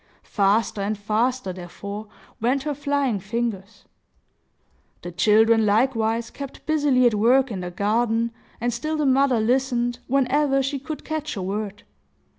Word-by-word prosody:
Faster 205 +1 +1
and 205 +2 -1
faster, 215 +1 -1
therefore, 200 +4 -8 0.3
went 255 +4 +1
her 300 -1 -2
flying 280 -5 0
fingers. 210 0 -4 1.2
The 175 - -6
children, 220 +5 +4
likewise, 225 +1 +1
kept 275 -1 -9
busily 290 -5 +3
at 240 - +4
work 245 +5 +3
in 195 - -4
the 180 0 -4
garden, 225 +5 0 0.3
and 240 +1 -1
still 310 +7 -2
the 300 - 0
mother 265 -2 +3
listened, 245 +1 0
whenever 275 +1 +2
she 275 +1 -2
could 300 +3 -7
catch 310 -3 -3
a 195 - -4
word. 205 +1 -4
235 Hz, 140 wpm, -23 LUFS, 210-270 Hz, 1.2 s, children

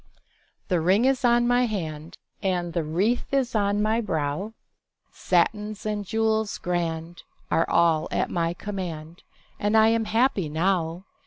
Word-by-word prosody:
THE 180 -5 +1
ring 190 +8 +3
is 270 0 +2
on 240 0 +4
my 245 0 +3
hand, 160 -7 -5 0.2
And 180 -4 -1
the 170 - 0
wreath 190 +11 0
is 265 -3 0
on 205 -1 +1
my 220 +2 +1
brow; 185 +2 -3 0.6
Satins 210 +4 0
and 210 -1 -2
jewels 220 +1 0
grand 170 -1 -3 0.3
Are 165 - +2
all 165 -2 +3
at - - -1
my 170 0 -1
command, 175 -5 -6 0.4
And 210 +2 +2
I 220 0 +6
am 225 0 +1
happy 220 - +1
now. 170 +2 -1
195 Hz, 145 wpm, -25 LUFS, 170-220 Hz, 0.6 s, I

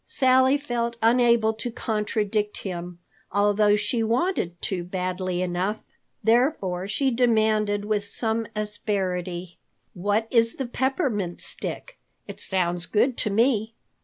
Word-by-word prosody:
Sally 260 +1 +4
felt 240 -4 -2
unable 235 -1 +4
to 225 +2 -5
contradict 210 -2 -2
him, 175 -2 -5 0.3
although 205 +1 +3
she 230 +3 -1
wanted 225 - 0
to 180 -3 -2
badly 185 0 -2
enough. 185 +4 -2 0.4
Therefore 225 - +1
she 265 +6 0
demanded 215 -4 +2
with 210 -1 0
some 225 +2 -1
asperity: 185 -4 -2 0.3
"What 205 +4 0
is 230 -2 +3
the 270 - -3
Peppermint 245 - -1
Stick? - - -4 0.3
It - - -8
sounds 175 -2 -1
good 245 +4 +2
to 215 - 0
me." 225 0 +1
215 Hz, 120 wpm, -25 LUFS, 190-235 Hz, 0.4 s, Sally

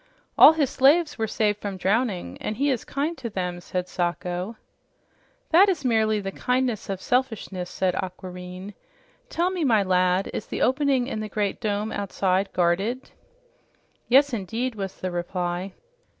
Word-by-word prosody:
"All 315 - +9
his 295 -5 0
slaves 300 +2 +3
were 220 - 0
saved 210 -1 0
from 200 -2 -4
drowning, 195 - -1
and 215 - -3
he 280 +2 +2
is 250 - -2
kind 295 +5 -2
to 240 -3 -4
them," 180 -3 -3
said 180 0 -3
Sacho. 180 +4 -3 0.9
"That 375 +5 +7
is 320 -8 -1
merely 220 -3 +2
the 195 -1 -4
kindness 250 -1 -1
of 195 -2 -2
selfishness," 220 -9 -1
said 185 0 0
Aquareine. 185 +1 -6 0.6
"Tell 350 +2 0
me, 365 -3 -2
my 225 -7 +4
lad, 185 0 +2
is - - -4
the - - -2
opening 265 -1 +2
in 235 -4 -4
the 215 0 -4
great 205 +1 -2
dome 210 0 -1
outside 195 -1 0
guarded?" 195 +9 0 1.0
"Yes 275 +2 +5
indeed," 230 +4 -2
was 195 -3 -5
the 185 - -3
reply. 175 +1 -3
210 Hz, 155 wpm, -25 LUFS, 185-255 Hz, 1.0 s, All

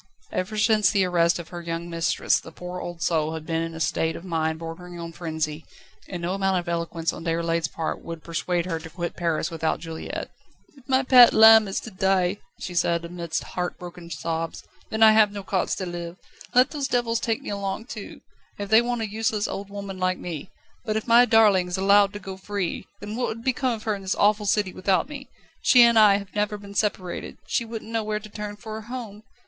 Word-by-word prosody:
Ever 200 +4 -3
since 215 -2 +4
the 200 -3 +2
arrest 170 -1 +2
of 170 -2 -8
her 175 -1 -7
young 170 0 -4
mistress 165 -1 +1
the 160 - -12
poor 180 +2 -7
old 175 -1 -6
soul 160 -1 +1
had 160 -1 -7
been 165 0 -1
in 165 0 -4
a - - -7
state 160 0 0
of - - -8
mind 160 -2 -1
bordering 170 +2 -8
on 170 0 -6
frenzy, 160 -2 -4 0.5
and 175 -2 -5
no 175 +2 -1
amount 195 -1 +1
of 175 - -3
eloquence 170 -1 -2
on - - -8
Déroulède's 165 -1 0
part 160 +1 -4
would 165 -1 -7
persuade 170 +1 -1
her 165 -3 -2
to 165 - -10
quit 170 +1 -5
Paris 170 -1 -1
without 160 -1 -1
Juliette. 165 -1 -6 0.4
"If 270 -1 -20
my 265 0 +3
pet 250 -2 +8
lamb 220 -1 +8
is 195 - -2
to 225 - -9
die," 190 0 +1 0.2
she 180 - -6
said 170 -1 +1
amidst 170 -2 -4
heart 180 0 -4
broken 175 -1 -10
sobs, 165 -1 -4 0.3
"then 220 0 +2
I 220 - +9
have 215 -1 +5
no 200 -1 -6
cause 190 -1 0
to 190 - -4
live. 175 0 -6 0.4
Let 250 +1 +5
those 285 -3 -2
devils 240 -3 0
take 225 -2 -2
me - - -5
along 200 +2 -3
too, 220 -6 -9 0.4
if 205 -1 -5
they 220 +2 +7
want 240 -1 -2
a 220 - -1
useless, 215 0 -1
old 200 0 -5
woman 200 -1 -7
like 185 0 +1
me. 170 -1 -6 0.3
But 215 -2 -1
if 220 - -3
my 240 +1 +7
darling 215 -6 +5
is 180 - -3
allowed 200 +1 +5
to 205 - -6
go 190 -2 -8
free, 195 -2 -3
then 205 +1 -6
what 245 +1 0
would 230 +1 -5
become 255 0 +1
of 220 -1 -7
her 215 - 0
in 200 - -5
this 190 -1 -1
awful 210 0 +2
city 200 -2 +1
without 185 +1 +1
me? 280 -2 -9 0.3
She 245 -2 +7
and 235 -1 +6
I 210 -2 +7
have 200 -1 -9
never 210 0 -1
been 200 -1 -11
separated; 200 -4 -2
she 235 - -1
wouldn't 225 -1 -7
know 225 -1 0
where 210 0 -2
to 215 0 -12
turn 210 0 -6
for 215 +1 -7
a - - -6
home. 230 -5 -7
190 Hz, 225 wpm, -25 LUFS, 170-215 Hz, 0.5 s, I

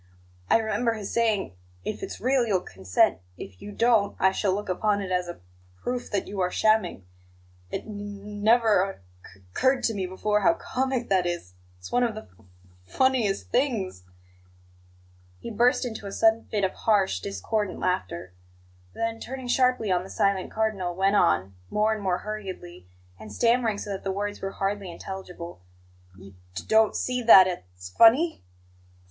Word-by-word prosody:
I - - +6
remember 225 +1 0
his 210 -3 -6
saying: 220 - +1 0.3
'If 215 - -4
it's 385 - -6
real, 260 0 +2
you'll 190 -4 +1
consent; 95 0 +1 0.2
if 95 -2 -10
you 205 - -8
don't, 225 -2 +2
I 190 - +4
shall 190 0 0
look 205 +2 -2
upon 205 +3 +1
it 195 -2 -5
as 180 -1 0
a 175 - -6
p - - -24 0.4
proof 245 0 -3
that 200 -3 -2
you 200 0 -6
are 180 -1 +1
shamming.' 215 - +1 0.6
It - - -4
n 210 -2 -8
n 205 0 -8
never 220 -3 +5
oc - - -25 0.3
c 95 0 -20
curred 260 0 +2
to 225 - +1
me 190 -3 -2
before 210 +3 0
how 330 - +4
comic 260 -4 -2
that 185 -2 +2
is; 175 - -4 0.2
it's 90 0 -11
one 245 - +2
of 235 -3 0
the 215 - -6
f - - -20
f 110 - -22 0.4
funniest 230 - 0
things 230 - 0 0.7
" 90 0 -30
He 235 - -5
burst 240 +4 +2
into 220 -4 -6
a - - -6
sudden 225 +2 +3
fit 210 -2 -2
of 190 - +1
harsh, 200 - +1
discordant 185 - -3
laughter; 95 - -2 0.6
then, 230 0 -2
turning 260 +1 -7
sharply 250 -4 +2
on 180 -1 +2
the 190 - -11
silent 195 -1 0
Cardinal, 200 -5 -1
went 195 +2 +2
on, 95 - +2 0.2
more 215 +1 +2
and 215 - -5
more 185 -2 0
hurriedly, 185 - -7 0.3
and 110 -1 -10
stammering 230 - +2
so 205 - -6
that 195 - -5
the 195 - -1
words 205 +1 -4
were 195 0 -4
hardly 195 -1 -2
intelligible: 180 - -8 0.6
"You 100 0 -13
d 95 - -22 0.2
d - - -4
don't 220 -1 +4
see 250 0 -1
that 220 -5 +9
it's 90 - -7
f - - -27
f - - -28
funny? 270 +9 +5
200 Hz, 185 wpm, -26 LUFS, 180-225 Hz, 0.7 s, that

